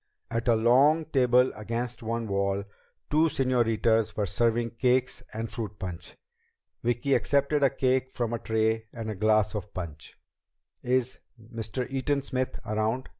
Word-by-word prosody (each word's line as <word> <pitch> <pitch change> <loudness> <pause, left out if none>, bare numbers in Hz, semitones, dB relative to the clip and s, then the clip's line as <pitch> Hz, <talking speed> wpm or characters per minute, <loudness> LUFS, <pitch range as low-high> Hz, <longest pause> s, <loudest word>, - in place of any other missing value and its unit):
At 115 +1 -2
a 120 - +5
long 135 +8 +4
table 125 -3 +3
against 115 +3 -4
one 115 0 -3
wall, 100 0 0 0.5
two 155 +2 +4
señoritas 115 -5 +1
were 105 - +1
serving 115 +4 +1
cakes 125 +1 +1
and 110 +1 -4
fruit 105 -2 -6
punch. 90 -4 -7 0.7
Vicki 120 +4 0
accepted 140 +2 +2
a 140 - +5
cake 130 -1 +1
from 120 -3 -3
a 115 - -2
tray 110 0 0
and 110 -2 -4
a - - -5
glass 110 +1 +2
of 105 -1 -6
punch. 80 -5 -7 0.6
"Is 125 0 0 0.2
Mr. 115 +1 -4
Eaton 135 +1 -1
Smith 130 -2 -2
around?" 110 +4 -1
115 Hz, 145 wpm, -27 LUFS, 110-130 Hz, 0.7 s, a